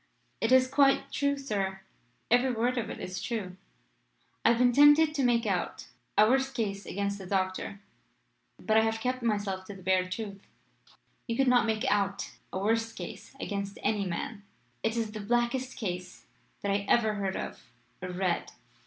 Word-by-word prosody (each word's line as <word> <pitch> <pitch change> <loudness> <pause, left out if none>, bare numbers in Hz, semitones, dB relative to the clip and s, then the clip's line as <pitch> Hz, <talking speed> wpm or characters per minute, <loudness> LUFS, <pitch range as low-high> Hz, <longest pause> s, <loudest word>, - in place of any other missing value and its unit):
"It 225 - +1
is 260 0 +6
quite 275 0 +3
true, 280 -1 +1
sir; 195 -8 -2 0.5
every 245 +2 +4
word 245 +2 0
of 225 - -4
it - - -6
is 185 0 -5
true. 200 -6 -3 0.9
I - - +6
have 235 - +4
been 245 0 +4
tempted 295 +4 +6
to 280 -3 0
make 240 -2 +3
out 185 - -2 0.3
a 210 - +7
worse 265 +2 +2
case 205 -6 -3
against 200 +1 -2
the 190 - -8
doctor, 190 +1 -2 0.8
but 220 0 +2
I - - +7
have 225 0 0
kept 255 +2 -1
myself 205 -4 -1
to 205 - -8
the 190 - -13
bare 185 0 +2
truth." 200 0 -5 0.9
"You 230 -1 -2
could 270 - +3
not 245 -2 +4
make 220 -1 0
out 200 -1 0 0.2
a - - -3
worse 225 +3 +1
case - - -8
against 200 -4 -4
any 205 -2 +1
man. 200 +4 -4 0.4
It 225 +1 0
is 225 -2 -1
the 215 - -6
blackest 240 +4 0
case 180 -4 -5 0.4
that 200 - -1
I 200 0 +1
ever 220 -2 +4
heard 195 -2 -2
of - - -5 0.4
or 185 - -4
read. 180 -1 -1
220 Hz, 180 wpm, -29 LUFS, 195-245 Hz, 0.9 s, a